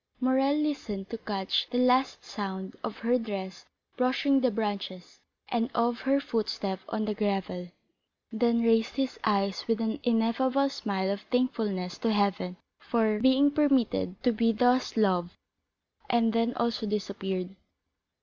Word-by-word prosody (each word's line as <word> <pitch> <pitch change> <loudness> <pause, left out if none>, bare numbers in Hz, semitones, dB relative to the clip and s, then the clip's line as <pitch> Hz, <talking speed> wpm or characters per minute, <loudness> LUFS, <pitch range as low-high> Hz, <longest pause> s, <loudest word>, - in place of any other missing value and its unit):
Morrel 265 +2 +2
listened 275 -10 -2
to 230 - -4
catch 195 -4 -1
the 245 - -2
last 250 +1 +2
sound 190 -2 -5
of 215 - -4
her 245 +2 +3
dress 195 -5 -6 0.3
brushing 265 +2 +2
the 255 - +3
branches, 200 -4 -4 0.3
and 235 0 0
of 235 0 +1
her 275 +1 +2
footstep 210 -7 -2
on 215 - -1
the 215 - -1
gravel, 195 -4 -2 0.6
then 235 +1 +2
raised 225 0 +3
his 270 -2 -2
eyes 195 -3 0
with 225 -1 +1
an 225 -1 -1
ineffable 245 +4 +2
smile 195 -7 -2
of 200 0 -3
thankfulness 210 -8 -1
to 230 - +1
heaven 200 -3 0 0.2
for 220 -2 +1
being 260 +4 +4
permitted 245 - +2
to 245 - +4
be 230 +1 +2
thus 245 +2 +2
loved, 185 -4 +1 0.7
and 230 -2 +3
then 230 +1 +1
also 235 -2 -1
disappeared. 195 -2 -3
225 Hz, 140 wpm, -28 LUFS, 200-250 Hz, 0.7 s, being